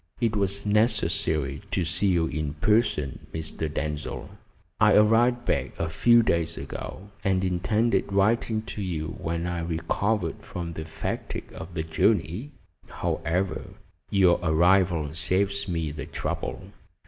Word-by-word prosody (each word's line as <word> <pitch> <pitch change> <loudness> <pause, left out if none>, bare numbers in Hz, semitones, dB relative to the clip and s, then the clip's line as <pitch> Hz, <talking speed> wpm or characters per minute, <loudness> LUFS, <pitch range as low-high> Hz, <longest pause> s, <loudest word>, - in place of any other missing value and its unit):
"It 115 -3 +1
was 100 0 +1
necessary 85 - +1
to 95 -4 0
see 85 +5 +1
you 75 -4 0
personally, 105 - +2 0.2
Mr. 80 -1 -3
Denzil. 75 0 -4 0.5
I - - +6
arrived 120 +3 +4
back - - -1
a 80 - -1
few 120 +8 +5
days 85 -5 0
ago, 90 +7 -7
and 95 -1 +2
intended 100 +5 +1
writing 110 +2 +2
to 110 - -6
you 80 -5 -2
when 85 +1 -2
I 90 -1 -2
recovered 85 +3 -1
from 85 -2 -5
the 80 0 -6
fatigue 80 - -5
of 90 - -9
the 80 - -1
journey. 90 - +1 0.4
However, 85 0 -2 0.3
your 95 -3 +4
arrival 85 -2 +3
saves 100 +5 0
me 80 -4 -1
the 75 - -6
trouble. - - -4
90 Hz, 130 wpm, -26 LUFS, 80-105 Hz, 0.5 s, I